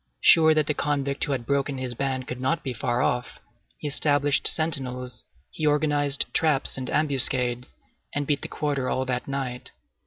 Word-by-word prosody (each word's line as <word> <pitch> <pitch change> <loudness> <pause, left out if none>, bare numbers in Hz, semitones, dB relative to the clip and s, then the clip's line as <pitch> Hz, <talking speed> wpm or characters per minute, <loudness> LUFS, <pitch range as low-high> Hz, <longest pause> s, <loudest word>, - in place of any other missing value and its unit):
Sure 160 -1 +6
that 155 -1 +2
the 150 - 0
convict 140 -1 -1
who - - -4
had 130 -4 -2
broken 140 0 -1
his 130 -1 -4
ban 130 +1 -2
could 125 0 -7
not 135 +5 -1
be 130 - -3
far 120 +2 -1
off, 125 0 -2 0.4
he - - -5
established 145 0 +3
sentinels, 125 -6 0 0.3
he 155 - -7
organized 145 -1 +1
traps 155 -4 +1
and 130 -1 -4
ambuscades, 130 -4 +1 0.4
and 145 0 -1
beat 145 0 0
the - - -5
quarter 140 -4 -2
all 130 - -1
that 125 -1 -3
night. 135 -3 -4
140 Hz, 175 wpm, -25 LUFS, 125-145 Hz, 0.4 s, Sure